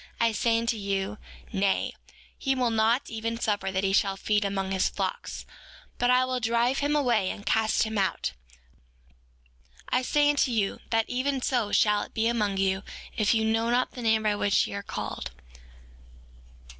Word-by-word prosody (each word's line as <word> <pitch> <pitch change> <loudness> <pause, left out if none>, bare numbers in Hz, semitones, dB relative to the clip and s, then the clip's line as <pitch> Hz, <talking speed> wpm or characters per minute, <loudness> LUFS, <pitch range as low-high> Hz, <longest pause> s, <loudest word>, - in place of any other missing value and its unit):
I 230 0 +3
say 225 +1 +1
unto 230 0 0
you, 200 0 -2 0.3
Nay; 195 -1 +1 0.4
he 270 -1 0
will 250 -2 +1
not 225 +4 +2
even 230 +1 -3
suffer 205 -4 -1
that 190 0 -1
he 195 0 +1
shall 195 -1 +2
feed 210 +1 +1
among 195 -1 -2
his 190 -1 +1
flocks, 485 - -4 0.5
but 245 - +2
will 255 0 +3
drive 235 +3 +1
him 290 +1 +1
away, 240 -9 +2
and 205 - -7
cast 220 -1 +2
him 220 -1 -2
out. 190 - 0 1.6
I 250 - +2
say 290 +3 +2
unto 285 -2 +1
you, 215 -5 0
that 225 -1 +2
even 265 +2 -1
so 235 -6 0
shall 210 -1 +3
it - - -9
be 225 - +1
among 210 -4 +1
you 190 0 +1 0.3
if 215 +1 +2
ye 220 - +2
know 225 +1 +1
not 245 +1 +1
the 250 - -8
name 220 -1 +2
by 210 -1 +2
which 205 -1 +2
ye - - -7
are 200 - -3
called. - - -5
220 Hz, 175 wpm, -27 LUFS, 200-245 Hz, 1.6 s, I